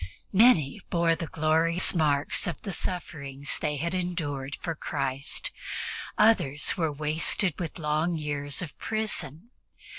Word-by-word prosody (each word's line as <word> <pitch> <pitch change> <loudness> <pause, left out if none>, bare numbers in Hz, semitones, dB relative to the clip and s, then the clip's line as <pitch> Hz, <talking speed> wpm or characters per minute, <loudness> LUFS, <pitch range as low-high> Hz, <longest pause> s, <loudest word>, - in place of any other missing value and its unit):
Many 190 - +5
bore 170 -1 +3
the 165 -1 -5
glorious 160 +3 +3
marks 150 -3 +2
of 170 - -4
the 200 - -4
sufferings 140 -7 -4
they 150 - -1
had 170 +5 -2
endured 150 -7 -3
for 165 - -3
Christ; 140 -2 -2 0.7
others 180 -10 +3
were 160 -3 0
wasted 155 +5 +1
with 170 -4 -4
long 160 +2 0
years 145 +2 -2
of 155 - -8
prison. 215 - -2
160 Hz, 125 wpm, -28 LUFS, 145-175 Hz, 0.7 s, Many